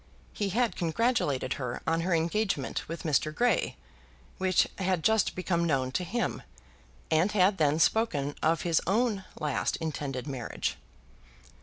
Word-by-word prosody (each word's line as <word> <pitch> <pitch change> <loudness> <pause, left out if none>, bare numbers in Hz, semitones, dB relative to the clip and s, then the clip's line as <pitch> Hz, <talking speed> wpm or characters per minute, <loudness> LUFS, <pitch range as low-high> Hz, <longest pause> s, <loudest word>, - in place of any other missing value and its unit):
He 205 -2 -1
had 235 +3 +1
congratulated 165 - 0
her 125 -1 -4
on 165 0 +1
her 175 0 +1
engagement 170 -2 -1
with 165 - -5
Mr. 155 -1 +1
Grey, 240 +10 +1 0.6
which 185 -1 +3
had 185 -3 0
just 220 -2 +3
become 180 -2 0
known 135 -6 +1
to 180 - -1
him, 230 +7 -2 0.7
and 165 +6 +3
had 195 -1 +3
then 150 -1 +3
spoken 155 -6 +2
of 160 +1 +2
his 170 -2 +2
own 210 -1 +1
last 150 -3 0
intended 145 -5 -4
marriage. 135 -5 -3
170 Hz, 140 wpm, -29 LUFS, 150-200 Hz, 0.7 s, which